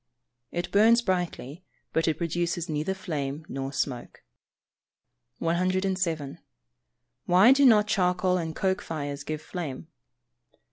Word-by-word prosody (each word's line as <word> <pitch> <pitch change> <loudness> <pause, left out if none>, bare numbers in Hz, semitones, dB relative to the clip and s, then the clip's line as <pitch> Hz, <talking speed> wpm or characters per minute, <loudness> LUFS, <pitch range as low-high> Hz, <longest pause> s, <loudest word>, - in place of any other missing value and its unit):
_ - - -54 0.5
It 175 0 -4
burns 230 +3 +5
brightly, 175 - -3 0.3
but 160 - +1
it 160 - +1
produces 170 0 -2
neither 155 +5 -2
flame 150 -5 -4
nor 135 0 -4
smoke. 130 -3 -4 1.1
107. 180 -3 -1 0.9
_Why 190 +8 +7
do 280 +1 +3
not 210 -3 +6
charcoal 180 -2 +1
and 160 -2 -4
coke 190 +1 0
fires 145 -3 -5
give 155 +1 -5
flame? 160 -3 -6
175 Hz, 120 wpm, -27 LUFS, 155-185 Hz, 1.1 s, Why